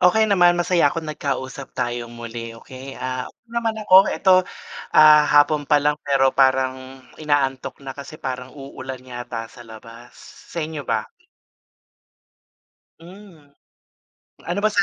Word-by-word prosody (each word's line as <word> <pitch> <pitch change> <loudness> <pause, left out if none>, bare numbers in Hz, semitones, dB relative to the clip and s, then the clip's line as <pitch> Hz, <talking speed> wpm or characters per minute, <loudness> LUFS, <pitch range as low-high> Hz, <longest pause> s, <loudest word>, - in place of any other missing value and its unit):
Okey, 220 +5 +4
naman 175 -3 +5
masaya 175 -3 +2
ako 165 +2 -5
nag-kausap 140 -3 -5
tayo 120 0 -3
muli 115 -1 -8
okay, 130 +3 -11
ah, 130 0 -4 0.2
naman 230 -1 -2
ako 190 -1 +7
eto, 190 -2 +3 0.6
ah, 150 -1 +8
hapon 145 0 +3
pa 150 - +5
lang 150 0 +1
pero 135 -2 +2
parang 130 0 0 0.2
ina-antok 140 -3 -1
na 135 - -6
kasi 140 +3 -10
parang 130 -4 -5
uulan 130 -2 -8
yata 120 -2 -6
sa 125 - -15
labas 115 +2 -13 0.3
sa 170 - -7
inyo 155 -1 -6
ba? 110 -2 0 2.0
Hmm, 175 -3 -15 1.0
ano 175 +4 -2
ba 215 - +3
sa 205 -1 +2
140 Hz, 135 wpm, -21 LUFS, 130-165 Hz, 2.0 s, ah